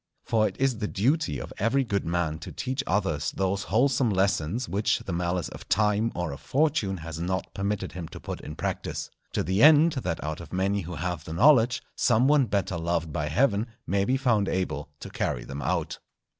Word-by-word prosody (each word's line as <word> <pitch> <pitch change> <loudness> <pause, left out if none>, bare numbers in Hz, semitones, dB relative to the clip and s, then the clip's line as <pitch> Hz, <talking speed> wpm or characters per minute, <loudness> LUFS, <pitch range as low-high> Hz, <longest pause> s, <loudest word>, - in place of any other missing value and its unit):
For 110 -2 +2
it - - -7
is 130 -4 +1
the 105 - -1
duty 125 - +1
of - - -7
every 120 +6 +2
good 100 -7 -2
man 80 -2 -1
to 80 - -8
teach 130 +2 -3
others 85 -7 0
those 95 +1 0
wholesome 125 +3 +2
lessons 100 +2 0
which 100 +4 +1
the 95 - -3
malice 90 0 -1
of - - -11
Time 105 +3 +2
or 90 -3 -2
of 70 - -8
Fortune 135 -9 +1
has 80 -1 -6
not 95 +2 -2
permitted 100 +1 -2
him 90 -3 -6
to - - -10
put - - -6
in 75 - -8
practice; - - -4 0.2
to - - 0
the 95 +3 0
end, 155 +2 +7
that 105 - -3
out 75 +2 -4
of 85 - -11
many 95 +2 0
who 90 0 -6
have 85 0 -3
the 80 - -6
knowledge, 125 - +5
some 120 +2 +3
one 145 -3 +4
better 95 -3 -1
loved 85 -2 -1
by 75 0 -1
Heaven 105 - +2 0.2
may 100 +1 +1
be 130 +6 +1
found 120 -7 +2
able 75 -6 -2
to - - -8
carry - - -2
them 70 +1 -6
out. - - -2
100 Hz, 205 wpm, -27 LUFS, 85-120 Hz, 0.2 s, end